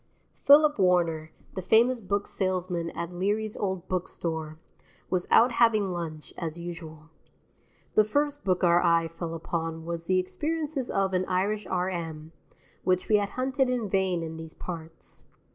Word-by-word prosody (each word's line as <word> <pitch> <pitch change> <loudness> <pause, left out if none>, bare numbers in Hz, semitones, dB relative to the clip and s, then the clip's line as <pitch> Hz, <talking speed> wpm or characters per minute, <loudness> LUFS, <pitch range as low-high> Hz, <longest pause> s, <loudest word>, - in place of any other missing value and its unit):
Philip 295 -2 +5
Warner, 170 -4 +2 0.2
the 190 - -4
famous 230 +6 +3
book 200 +1 -1
salesman 180 -3 -2
at 170 +1 -4
Leary's 205 +4 -1
Old 190 -2 -3
Book 185 -1 -1
Store, 160 -2 -4 0.5
was 180 -1 0
out 245 +2 +6
having 220 -5 +3
lunch, 160 -3 -6
as 165 -1 -4
usual. 165 -2 -8 0.8
The 215 - +6
first 290 +6 -1
book 185 -1 +1
our 175 0 +5
eye 165 -1 +3
fell 165 0 -5
upon 165 0 -4
was 170 0 -5
"The 185 - +3
Experiences 295 - -2
of 195 -1 0
an 185 0 +1
Irish 195 +3 0
R.M.," 170 -4 -3 0.5
which 185 -1 +1
we 215 - +6
had 200 -1 -1
hunted 265 0 +1
in 245 -4 -1
vain 185 -3 +1
in 160 0 -6
these 160 0 -9
parts. 165 -2 -9
185 Hz, 155 wpm, -27 LUFS, 165-210 Hz, 0.8 s, out